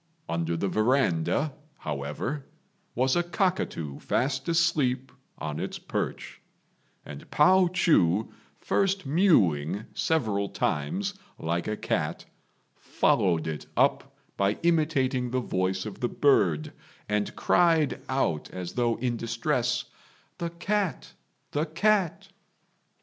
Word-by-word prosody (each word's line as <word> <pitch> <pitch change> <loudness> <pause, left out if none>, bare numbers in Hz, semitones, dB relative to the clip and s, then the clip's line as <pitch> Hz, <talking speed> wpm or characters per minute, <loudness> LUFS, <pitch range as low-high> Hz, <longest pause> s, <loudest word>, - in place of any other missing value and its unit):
Under 85 0 -1
the 100 - -1
verandah, 125 - +1 0.2
however, 75 - -4 0.5
was 130 +2 +2
a 175 - +3
cockatoo 175 - -1
fast 130 +3 -1
asleep 140 -7 +1 0.3
on 75 -1 -4
its - - -4
perch; - - -4 0.6
and 70 -1 -10
Pao 185 +4 +5
chu 115 - +2 0.2
first 195 -2 0
mewing 110 - +3
several 105 -11 0
times 190 - -1 0.2
like 85 +1 -2
a 105 0 -2
cat, - - -2 0.5
followed 85 -3 +1
it 80 -2 -5
up - - +1 0.2
by 100 +1 +1
imitating 145 -7 +2
the 130 +1 0
voice 95 -5 -1
of 105 - -7
the 120 - 0
bird, 85 - +2 0.3
and 105 0 -1
cried 165 -5 +3
out 110 - 0
as 90 -1 -6
though 120 -2 +1
in 120 -1 -1
distress, 125 +1 -1 0.5
"The 170 - -2
cat! 180 0 -2 0.4
the 150 +3 0
cat!" 190 +2 +1
125 Hz, 110 wpm, -27 LUFS, -, 0.6 s, Pao